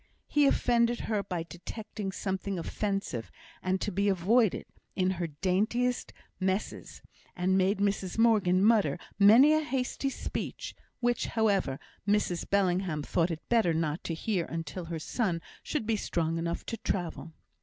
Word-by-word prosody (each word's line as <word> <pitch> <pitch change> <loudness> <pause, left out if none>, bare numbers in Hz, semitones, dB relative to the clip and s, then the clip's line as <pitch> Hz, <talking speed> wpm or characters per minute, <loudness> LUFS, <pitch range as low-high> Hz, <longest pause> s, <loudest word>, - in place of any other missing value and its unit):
He 295 -1 +4
offended 240 -2 +2
her 215 -2 -1
by 180 -4 -3
detecting 195 +5 -6
something 190 0 -3
offensive 195 - -3 0.3
and 185 +1 0
to 210 - -1
be 200 +2 +1
avoided 200 +4 +2 0.3
in 185 -1 +2
her 175 -2 -2
daintiest 205 +10 0 0.3
messes, 190 +2 -3 0.3
and 185 +1 +1
made 190 +2 +3
Mrs 200 -2 -1
Morgan 205 -5 +4
mutter 210 -10 +4 0.2
many 230 +9 +8
a 310 - +3
hasty 270 -1 -2
speech, - - -5 0.3
which, 240 -1 +1
however, 200 - +1 0.3
Mrs 200 -4 +1
Bellingham 185 -5 +1
thought 165 +3 +1
it 165 -2 -6
better 220 -9 +3
not 160 0 -1
to 165 - -2
hear 180 0 -1
until 165 +2 -5
her 165 0 -4
son 175 - -1 0.2
should 300 -8 -3
be 220 0 +1
strong 165 -4 -1
enough 170 0 -3
to 230 - -4
travel. 165 -7 -3
195 Hz, 145 wpm, -29 LUFS, 170-220 Hz, 0.3 s, many